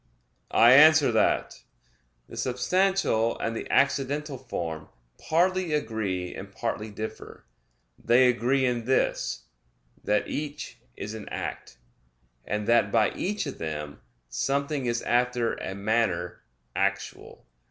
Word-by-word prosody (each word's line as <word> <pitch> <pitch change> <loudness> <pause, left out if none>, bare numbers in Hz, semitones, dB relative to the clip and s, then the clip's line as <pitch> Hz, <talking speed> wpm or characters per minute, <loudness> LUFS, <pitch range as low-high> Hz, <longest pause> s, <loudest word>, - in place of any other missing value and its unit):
I 120 +1 +7
answer 150 0 +7
that, 110 - +1 0.7
The - - -11
substantial 130 -2 +1
and 115 - -3
the - - -6
accidental 140 +1 +1
form 80 -11 -5 0.3
partly 180 +1 +1
agree 110 -10 -2
and 100 0 -9
partly 110 0 -4
differ. 110 - -8 0.6
They 125 +2 +5
agree 125 +2 +2
in 120 -2 -1
this, 125 - 0 0.6
that 105 0 +1
each 150 0 -5 0.2
is 105 +2 -6
an 110 -2 -8
act; 60 - -6 0.7
and 105 0 -2
that 115 -3 +3
by - - +3
each 205 0 -2
of 140 - -6
them 75 -2 -5 0.3
something 140 - -1
is 120 0 -1
after 120 -1 +1
a 95 - -5
manner 100 -4 -1 0.3
actual. - - -3
120 Hz, 120 wpm, -27 LUFS, 105-140 Hz, 0.7 s, I